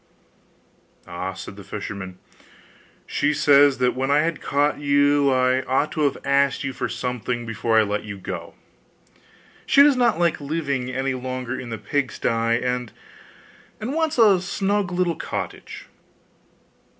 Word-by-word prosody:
'Ah!' 90 Hz, +2 st, -5 dB
said 95 Hz, +1 st, -9 dB
the 100 Hz, -, -10 dB
fisherman, 95 Hz, -2 st, -7 dB, 0.9 s
'she 150 Hz, +1 st, 0 dB
says 140 Hz, -1 st, +5 dB
that 125 Hz, 0 st, +1 dB
when 130 Hz, +1 st, -2 dB
I 145 Hz, +1 st, +4 dB
had 160 Hz, -1 st, -2 dB
caught 145 Hz, +1 st, 0 dB
you, 145 Hz, 0 st, +3 dB
I 130 Hz, 0 st, +2 dB
ought 140 Hz, +4 st, 0 dB
to 155 Hz, -, -3 dB
have 140 Hz, -, 0 dB
asked 140 Hz, 0 st, +2 dB
you 135 Hz, -1 st, -3 dB
for 125 Hz, -1 st, -3 dB
something 125 Hz, 0 st, -3 dB
before 115 Hz, 0 st, 0 dB
I 110 Hz, -, +6 dB
let 105 Hz, 0 st, -2 dB
you 100 Hz, -2 st, -7 dB
go; 95 Hz, -, -7 dB, 1.1 s
she 280 Hz, -, +6 dB
does 290 Hz, -1 st, +5 dB
not 240 Hz, -6 st, +2 dB
like 170 Hz, -3 st, +1 dB
living 140 Hz, -4 st, -2 dB
any 135 Hz, +1 st, -2 dB
longer 130 Hz, 0 st, -4 dB
in 125 Hz, -2 st, -7 dB
the 115 Hz, -, -4 dB
pigsty, 140 Hz, 0 st, -2 dB, 0.4 s
and 125 Hz, -1 st, -2 dB, 0.9 s
wants 305 Hz, +7 st, -1 dB
a 205 Hz, -6 st, +5 dB
snug 195 Hz, +1 st, -1 dB
little 175 Hz, -2 st, 0 dB
cottage. -, -, -6 dB
135 Hz, 145 wpm, -23 LUFS, 125-155 Hz, 1.1 s, I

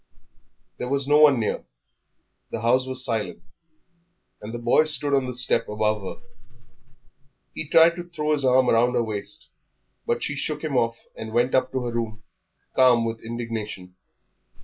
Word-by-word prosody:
There 125 Hz, -, -4 dB
was 140 Hz, 0 st, 0 dB
no 150 Hz, +1 st, +5 dB
one 145 Hz, -5 st, +6 dB
near, 110 Hz, -, -2 dB, 0.9 s
the 110 Hz, -, -5 dB
house 125 Hz, +3 st, +2 dB
was 130 Hz, 0 st, 0 dB
silent, 105 Hz, -7 st, -3 dB, 1.0 s
and 105 Hz, -, -7 dB
the 120 Hz, -, -5 dB
boy 120 Hz, +6 st, +3 dB
stood 145 Hz, -2 st, +2 dB
on 135 Hz, -2 st, +2 dB
the 125 Hz, -, -5 dB
step 125 Hz, -1 st, +1 dB
above 105 Hz, 0 st, 0 dB
her. 95 Hz, -, -8 dB, 1.3 s
He 155 Hz, -, -5 dB
tried 165 Hz, +1 st, +6 dB
to 175 Hz, 0 st, -8 dB
throw 155 Hz, -2 st, -2 dB
his 150 Hz, -2 st, +2 dB
arm 130 Hz, 0 st, +4 dB
round 120 Hz, +2 st, +3 dB
her 120 Hz, -, +2 dB
waist, 105 Hz, -3 st, -4 dB, 0.6 s
but 120 Hz, -, -1 dB
she 150 Hz, -, -2 dB
shook 150 Hz, +2 st, -4 dB
him 155 Hz, -4 st, -2 dB
off 115 Hz, -2 st, +1 dB, 0.2 s
and 110 Hz, 0 st, -7 dB
went 120 Hz, +2 st, +1 dB
up 130 Hz, 0 st, +2 dB
to 130 Hz, -1 st, -1 dB
her 120 Hz, -, -3 dB
room 110 Hz, -2 st, -4 dB, 0.5 s
calm 125 Hz, -3 st, +5 dB
with 115 Hz, 0 st, -4 dB
indignation. 110 Hz, -5 st, -6 dB
120 Hz, 170 wpm, -24 LUFS, 115-140 Hz, 1.3 s, one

